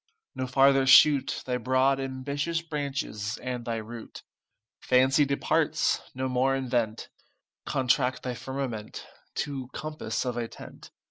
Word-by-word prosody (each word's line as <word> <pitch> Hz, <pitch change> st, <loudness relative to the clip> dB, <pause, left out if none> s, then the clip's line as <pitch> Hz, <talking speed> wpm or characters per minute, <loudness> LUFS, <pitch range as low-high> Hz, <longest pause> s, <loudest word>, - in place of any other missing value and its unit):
No 130 Hz, -, -3 dB
farther 135 Hz, +1 st, +4 dB
shoot 140 Hz, +1 st, +6 dB
Thy 125 Hz, -1 st, -1 dB
broad 130 Hz, +3 st, +2 dB
ambitious 140 Hz, +5 st, -3 dB
branches, 140 Hz, -9 st, -3 dB
and 125 Hz, -1 st, -5 dB
thy 115 Hz, -2 st, -2 dB
root. 115 Hz, +1 st, -8 dB, 0.6 s
Fancy 130 Hz, +3 st, +4 dB
departs; 140 Hz, 0 st, +1 dB
no 130 Hz, +1 st, -2 dB
more 130 Hz, +1 st, +1 dB
invent; 120 Hz, -4 st, -2 dB, 0.6 s
Contract 130 Hz, 0 st, +1 dB
thy 125 Hz, -, -3 dB
firmament 125 Hz, -4 st, -5 dB, 0.4 s
To 135 Hz, -3 st, -6 dB
compass 150 Hz, -7 st, -4 dB
of 125 Hz, -1 st, -2 dB
a 120 Hz, -1 st, -2 dB
tent. -, -, -12 dB
130 Hz, 125 wpm, -27 LUFS, 125-135 Hz, 0.6 s, shoot